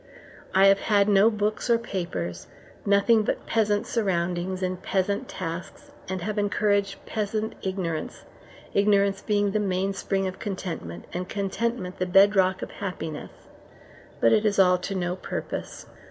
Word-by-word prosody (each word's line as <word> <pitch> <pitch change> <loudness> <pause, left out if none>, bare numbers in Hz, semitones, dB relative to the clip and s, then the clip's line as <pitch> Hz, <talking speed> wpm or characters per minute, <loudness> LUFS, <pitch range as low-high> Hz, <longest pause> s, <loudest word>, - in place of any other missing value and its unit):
I 190 +1 +7
have 195 0 +6
had 205 -1 +3
no 205 +1 +6
books 215 +2 -1
or 235 - +5
papers, 170 - -4 0.4
nothing 205 +3 +5
but 215 - -2
peasant 210 -2 +1
surroundings 185 -3 -1
and 185 0 -2
peasant 195 +1 -1
tasks, 185 - -6 0.2
and 185 -2 -3
have 210 +2 -2
encouraged 200 -1 0
peasant 215 0 -2
ignorance 180 -5 -3 0.5
ignorance 200 -1 +3
being 205 -2 +1
the 215 - +1
mainspring 195 0 -1
of 185 0 -4
contentment, 165 - -5
and 180 +1 -4
contentment 200 -1 -2
the 185 - 0
bed 195 +3 +6
rock 190 0 +2
of - - -6
happiness; 165 -6 -5 0.9
but 115 - +5
it 210 - +4
is 210 -2 +1
all 180 -2 +5
to 195 +2 -4
no 180 -1 -1
purpose. - - -5
195 Hz, 145 wpm, -26 LUFS, 185-205 Hz, 0.9 s, I